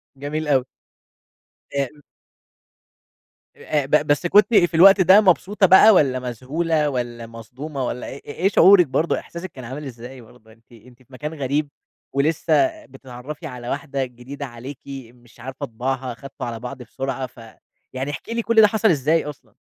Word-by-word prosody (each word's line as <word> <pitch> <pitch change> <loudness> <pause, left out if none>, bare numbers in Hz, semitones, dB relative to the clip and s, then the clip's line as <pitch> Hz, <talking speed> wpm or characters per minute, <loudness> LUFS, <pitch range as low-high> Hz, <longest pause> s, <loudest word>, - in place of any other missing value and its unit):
جميل 150 +3 -4
أوي. 135 -3 +2 1.1
إ 140 - 0
إم 145 +3 -10 1.6
آآ 150 -2 -1
أ - - -7
ب 150 +2 +2
بس 145 +4 +1
كنتِ 210 +5 +4
في 175 -3 +4
الوقت 195 +4 +7
ده 190 +3 +7
مبسوطة 195 +1 +2
بقى، 190 +4 +8
والّا 135 -7 +3
مذهولة، 150 +6 -1
والّا 120 -3 -4
مصدومة، 130 +5 -7
والّا 125 - -5
إ - - -10
إيه 180 +7 -1
شعورِِك 190 -4 +6
برضه، 155 +5 0
إحساسِك 170 +1 -9
كان 130 - -11
عامل 135 +5 -7
إزاي 125 +1 -10
برضه؟ 110 -1 -19
أنتِ 115 +2 -25
أنتِ 120 +2 -18
في 130 - -25
مكان 150 +4 -6
غريب، 145 0 -2 0.4
ولسّه 165 - +1
بتتعرّفي 130 +3 -10
على 125 -1 -8
واحدة 140 -2 -3
جديدة 125 +4 -9
عليكِ 125 +2 -10 0.3
مش 120 -1 -22
عارفة 130 +3 -6
طباعها، 130 +1 -4
خدتوا 135 +3 -9
على 115 -2 -5
بعض 125 +3 -7
بسرعة، 130 +2 -4
ف 120 - -19 0.5
يعني 135 +3 -3
احكي 225 - -7
لي 235 - -1
كُلّ 225 0 +4
ده 210 - +7
حصل 220 +1 +1
إزاي 155 0 +1
أصلًا؟ 150 -2 -10
140 Hz, 170 wpm, -21 LUFS, 125-165 Hz, 1.6 s, بقى